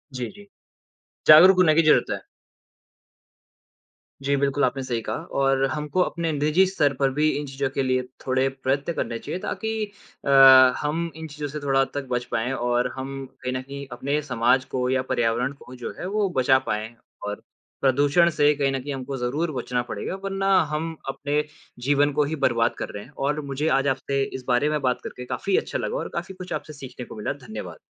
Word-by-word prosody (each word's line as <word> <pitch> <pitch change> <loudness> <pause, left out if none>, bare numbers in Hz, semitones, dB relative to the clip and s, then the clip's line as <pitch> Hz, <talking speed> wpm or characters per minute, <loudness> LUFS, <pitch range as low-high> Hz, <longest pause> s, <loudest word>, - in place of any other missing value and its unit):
जी, 125 -2 -3
जी। 205 0 -14 0.8
जागरूक 175 +5 +9
होने 155 -4 +5
की 165 - +5
जरूरत 155 -1 +4
है। - - -2 2.0
जी, 140 +1 +2
बिल्कुल 140 0 +1
आपने 130 +2 -2
सही 120 -3 -2
कहा - - -3 0.2
और 135 0 +2
हमको 150 +5 -2
अपने 170 -2 -1
निजी 155 +5 +3
स्तर 150 -7 +1
पर 135 0 +1
भी 155 +1 +4
इन 150 - -4
चीज़ों 135 0 -2
के 135 - +1
लिए 130 -1 +1 0.2
थोड़े 130 0 +2 0.2
प्रयत्न 140 +5 0
करने 115 -7 -3
चाहिए 180 - -5
ताकि 220 - -3 0.6
अ, - - -1 0.5
हम 165 +3 -2
इन 160 0 -7
चीज़ों 150 -1 -5
से 150 +2 -6
थोड़ा 135 -1 +2
हद 135 - -1
तक 145 -1 -3
बच 125 0 -1
पाएँ 115 +3 -1
और 120 -1 0
हम 135 +1 -5 0.3
कहीं 125 - -2
न 130 - -2
कहीं 140 +1 -8
अपने 140 +4 -1
समाज 125 -1 +2
को 125 -1 0
या 130 0 +2
पर्यावरण 120 +3 +1
को 125 - -11
जो 125 - -6
है - - -4
वो 210 -2 +2
बचा 130 +1 +5
पाएँ। 110 +2 -3 0.3
और 105 - -5 0.4
प्रदूषण 145 +6 +4
से 150 -2 +3
कहीं 140 -1 +1
न 135 - -1
कहीं 145 +1 -4
हमको 135 0 -5
ज़रूर 140 +7 -1
बचना 125 -1 -1
पड़ेगा, 120 - -5
वरना 195 0 -2 0.2
हम 160 +2 -2
अपने 145 +2 -1 0.4
जीवन 145 +2 +3
को 150 +1 +2
ही 155 +3 -2
बर्बाद 120 -5 +1
कर - - -4
रहे 105 - -6
हैं 135 - -16 0.2
और 150 +1 0
मुझे 140 +2 -3
आज 140 - -1
आपसे 135 +1 0
इस 130 -1 -6
बारे 125 +4 +2
में 150 0 0
बात 125 -2 0
करके 125 - -7
काफ़ी 195 +9 0
अच्छा - - -2
लगा - - -2
और - - -4
काफ़ी 190 - -4
कुछ 185 -1 -7
आपसे 155 - -5
सीखने 130 -3 -9
को - - -11
मिला। 105 +5 -3
धन्यवाद। 90 -7 -7
140 Hz, 200 wpm, -24 LUFS, 130-150 Hz, 2.0 s, जागरूक